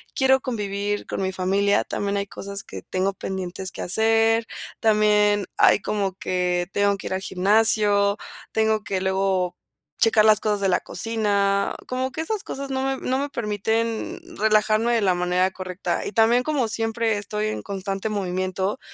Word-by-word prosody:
quiero 265 -1 +4
convivir 205 -4 -3
con - - -4
mi 190 0 -1
familia, 195 +2 +1
también 200 0 -2
hay 200 - -1
cosas 200 0 -7
que - - -9
tengo 190 +1 -1
pendientes 190 -1 -5
que - - -6
hacer, 225 +3 +2 0.3
también 210 -2 +3
¡ay! - - +5
como 195 -1 -2
que 180 -1 -1
tengo 200 0 +2
que - - -11
ir - - -3
al 190 - -2
gimnasio, 205 +1 +3 0.3
tengo 220 -1 +1
que 195 -2 -2
luego, 190 -1 0 0.5
checar 220 -1 +5
las 215 -1 +5
cosas 210 -2 -1
de 195 - +2
la 180 - +3
cocina, 200 -3 0
como 255 +1 -2
que 315 - -3
esas 415 +5 -1
cosas 275 0 -5
no 265 0 -1
me 270 0 -1
no 260 +1 +1
me 285 - -1
permiten 225 -1 -2 0.2
relajarme 215 +2 +2
de 230 - +2
la 190 -3 +3
manera 180 +1 +1
correcta, 185 0 -4
y - - -5
también, 230 +2 +4
como 275 -6 0
siempre 225 0 0
estoy 210 +1 -2
en 215 - -3
constante 195 0 -4
movimiento, 190 -1 -2
205 Hz, 170 wpm, -23 LUFS, 190-225 Hz, 0.5 s, ay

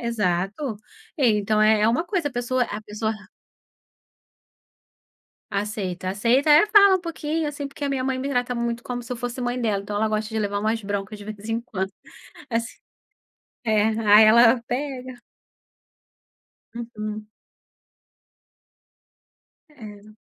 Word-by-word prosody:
Exato. 210 - -1 0.4
E 270 - +3
então, 210 +1 +1
é 215 0 +4
é 215 - +4
uma 250 +9 +1
coisa 350 -5 -1
a - - -11
pessoa 245 +1 0
a 215 -2 -6
pessoa 215 +1 -3
a 210 -1 -13 2.2
Aceita, 200 -3 -3
aceita. 240 +9 +2
É, 300 +7 +7
fala 400 -2 +6
um - - -7
pouquinho, 320 -2 -3
assim, 285 -1 -5
porque 285 +1 -7
a - - 0
minha 270 -2 -1
mãe 260 0 -1
me 270 - -3
trata 250 -2 -1
muito 235 0 -2
como 245 0 -5
se 250 +1 -6
eu - - -4
fosse 245 +2 -5
mãe 245 0 -2
dela. 210 -4 0
Então 205 +1 -5
ela 220 +1 +1
gosta 215 0 -1
de 220 0 -3
levar 205 -1 -1
umas 220 +1 -1
broncas, 205 +1 -4
de 205 - -10
vez 215 0 -8
em 225 +1 -1
quando. 190 -4 -4 0.6
Assim 230 0 -2 0.9
É, 215 -2 +3
aí 220 -1 +6
ela 235 +2 +6
pega 255 -1 -5 1.5
Uhum. 215 -2 -6 2.4
É. 215 -7 -13
230 Hz, 150 wpm, -23 LUFS, 210-255 Hz, 2.4 s, É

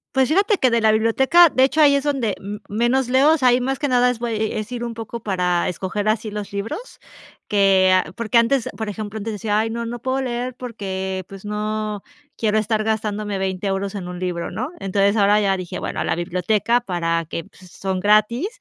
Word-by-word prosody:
Pues, 265 -1 +3
fíjate 395 +5 +2
que 255 - +4
de 235 -1 +2
la 220 -1 +4
biblioteca 265 +10 +5
de 260 - +3
hecho, 310 +4 +3
ahí 285 -1 +6
es 280 - 0
donde 260 -9 0
m 205 +1 -7
menos 240 +4 +1
leo, 275 +5 +5
o - - +2
sea, 255 - +3
ahí 245 0 +5
más 270 +1 -2
que 290 - 0
nada 250 -1 +3
es 235 - -6
voy 235 -1 -2
e 220 0 -1
es 215 +3 -7
ir 240 -1 -4
un 235 -1 -4
poco 225 0 -7
para 180 -3 0
escoger 195 +4 -3
así 215 0 0
los 210 -1 -6
libros 225 - -5 0.5
que 195 -2 +4
a 185 - 0
porque 235 0 0
antes, 235 +2 +2
por 220 -2 -3
ejemplo, 215 +1 -6
antes 215 +1 -4
decía: 210 0 -1
"Ay 225 +1 0
no, 235 0 -4
no 240 - -4
puedo 260 +2 -1
leer 250 0 -3
porque, 190 -6 -4
pues, 195 +1 -11
no 210 0 -3 0.3
quiero 215 -1 +1
estar 215 0 0
gastándome 210 -2 -2
20 190 0 -3
euros 195 +1 -2
en 185 -3 -5
un 180 0 -7
libro, 180 -2 -3
¿no?". 225 +10 -3
Entonces 200 +2 +1
ahora 205 +1 +4
ya 195 -2 +1
dije: 180 -2 -6
"Bueno, - - -4
a - - 0
la - - 0
biblioteca 185 +7 +1
para 170 -5 -1
que 165 0 -5
pues, 185 -1 -18
son 190 -1 -3
gratis 215 - +3
215 Hz, 225 wpm, -21 LUFS, 195-240 Hz, 0.5 s, ahí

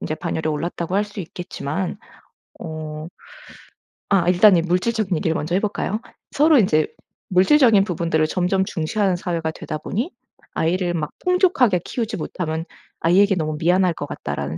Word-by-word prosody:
인제 155 - -3
반열에 160 -2 -3
올랐다고 170 +3 -3
할 205 +2 +2
수 205 -1 -8
있겠지만 175 +1 -5 0.6
어 155 -1 -6 1.0
아 190 -4 +3
일단 185 +2 +6
이 170 - +3
물질적인 185 +3 0
얘기를 160 - 0
먼저 165 +2 -2
해 - - +3
볼까요? 210 0 -2 0.3
서로 300 0 +4
인제 155 -7 +3 0.4
물질적인 210 +3 +5
부분들을 165 -4 0
점점 185 +3 +1
중시하는 190 +2 0
사회가 170 -2 -2
되다 155 -1 -6
보니 235 - -3 0.4
'아이를 175 +2 0
막 155 -3 -2 0.2
풍족하게 360 - +3
키우지 230 -2 -3
못하면 160 -1 -3 0.4
아이에게 195 +4 +4
너무 155 -4 -2
미안할 180 +1 +3
것 - - -5
같다.'라는 70 +2 -5
180 Hz, 355 characters per minute, -21 LUFS, 160-200 Hz, 1.0 s, 일단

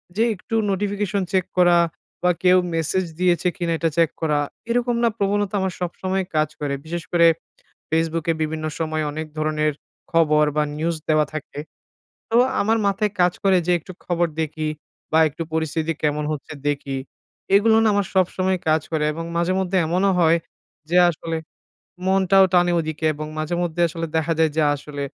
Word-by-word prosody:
যে 225 - +2
একটু 225 +4 -6
notification 200 0 -1
check 185 -2 +2
করা 175 -1 +5 0.5
বা 180 - +4
কেউ 185 0 +6 0.2
মেসেজ 165 +3 0
দিয়েছে 180 0 +2
কিনা 175 -3 -2
এটা 165 0 +1
চেক 165 -2 +4
করা, 150 -2 +1 0.3
এরকম 240 0 +1
না 235 - +4
প্রবণতা 205 0 0
আমার 190 -2 -1
সবসময় 185 +2 -2
কাজ 155 -1 +2
করে। 145 -2 -2
বিশেষ 170 +1 -4
করে 170 -1 +5 0.6
ফেসবুকে 165 0 0
বিভিন্ন 155 0 -2
সময় 155 -1 -1
অনেক 155 +1 -5
ধরনের 155 0 0 0.4
খবর 155 -2 +4
বা 150 - +3
নিউজ 165 +2 -1
দেওয়া 155 -1 +4
থাকে, 155 -1 -6 0.7
তো 230 - +2 0.3
আমার 225 +2 +2
মাথায় 205 +1 +1
কাজ 175 0 +4
করে 195 -1 +5
যে 180 - +3
একটু 185 +3 -11
খবর 175 -1 +1
দেখি 155 0 -2 0.4
বা 160 - +4
একটু 155 +3 -6
পরিস্থিতি 160 0 -1
কেমন 150 0 0
হচ্ছে 150 +1 -6 0.2
দেখি। 140 -1 -2 0.6
এগুলো 220 +2 +5
না 225 - +4
আমার 200 -1 +1
সবসময় 185 0 +1
কাজ 155 0 +4
করে 155 -1 +1
এবং 165 +2 -5
মাঝে 170 +2 +1
মধ্যে 190 0 -1
এমনও 185 +4 +2
হয় 165 0 +4 0.5
যে 175 - +2
আসলে 165 0 -4 0.7
মনটাও 190 0 +5
টানে 175 -1 +4
ওদিকে 155 0 -5
এবং 155 +1 -6
মাঝে 155 +3 -2
মধ্যে 175 0 -3
আসলে 165 +1 -4
দেখা 160 +1 +1
যায় 160 -1 +3
যে 160 - +3
আসলে 145 0 -7
170 Hz, 170 wpm, -22 LUFS, 155-190 Hz, 0.7 s, কেউ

